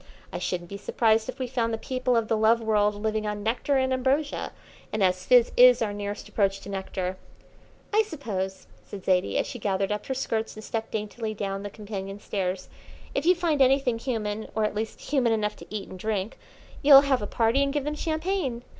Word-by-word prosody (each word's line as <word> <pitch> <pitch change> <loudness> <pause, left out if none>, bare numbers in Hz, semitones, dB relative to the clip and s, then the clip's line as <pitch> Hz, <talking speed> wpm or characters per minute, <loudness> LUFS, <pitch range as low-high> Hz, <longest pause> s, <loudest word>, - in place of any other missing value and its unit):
I - - -3
shouldn't 175 -1 -3
be 200 - -5
surprised 220 +2 +1
if 255 - -5
we 260 - -2
found 240 -2 -1
the 225 - -1
people 255 +1 0
of 225 -1 0
the 225 - +1
Love 220 +2 +4
World 210 -2 +2
living 215 0 -2
on 210 0 -3
nectar 245 +5 +1
and 260 0 +1
ambrosia, 270 +3 0 0.4
and 215 -2 0
as 185 0 +1
fizz 245 -2 +6
is 250 0 +8
our 215 -3 -1
nearest 205 0 -5
approach 195 -2 0
to 200 - -10
nectar 190 -1 -3 0.4
" - - -30
"I 430 - +6
suppose," 205 - -4 0.2
said 195 -2 -10
Zaidie, 185 -1 +2
as - - +1
she 245 - -7
gathered 195 -1 0
up 210 0 -3
her 265 - -2
skirts 225 -4 -2
and 215 - -9
stepped 225 0 -4
daintily 215 +1 -4
down 195 -1 -3
the 205 - -5
companion 200 -1 -7
stairs, 185 -2 -3 0.5
"if 280 +4 -1
you 365 - +6
find 330 -5 0
anything 260 -3 +3
human, 220 -4 -3
or 220 - +1
at 210 - -1
least 220 +1 -4
human 255 -6 +1
enough 210 -1 -1
to - - -12
eat 210 -2 -5
and 185 - -10
drink, 215 +1 -2 0.4
you'll 275 -1 +9
have 275 -4 +1
a 205 - -3
party 230 +6 +2
and 280 0 +1
give 290 -1 -1
them 295 +1 -2
champagne. 315 -5 -2
220 Hz, 215 wpm, -26 LUFS, 205-260 Hz, 0.5 s, you'll